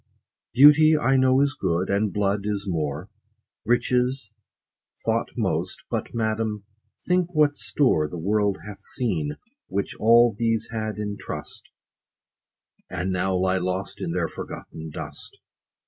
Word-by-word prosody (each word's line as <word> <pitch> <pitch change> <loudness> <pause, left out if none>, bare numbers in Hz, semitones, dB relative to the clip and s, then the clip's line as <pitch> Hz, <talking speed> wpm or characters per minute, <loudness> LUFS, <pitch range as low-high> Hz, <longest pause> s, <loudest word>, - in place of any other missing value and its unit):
Beauty 150 +3 +7
I 135 -2 +2
know 130 0 +4
is 140 -1 +2
good, 90 +1 -1
and 100 +1 +1
blood 100 0 0
is 105 -1 -2
more; 75 -5 -3 0.5
Riches 125 0 +1 0.7
thought - - 0
most; - - -2
but, - - -2
madam, 110 -2 -1 0.4
think 180 -1 +1
what 150 -1 +4
store 80 - +1
The 90 - -6
world 100 +3 +1
hath 105 -2 -9
seen, 80 - -2 0.3
which 100 +1 -2
all 115 0 +5
these 115 0 0
had 110 -2 -3
in 105 -1 -4
trust, - - -7 1.2
30 95 - -5
And 95 +1 -1
now 95 +1 0
lie 95 +1 +1
lost 95 +1 -3
in - - -2
their - - 0
forgotten 80 0 -8
dust. - - -8
105 Hz, 135 wpm, -24 LUFS, 95-125 Hz, 1.2 s, Beauty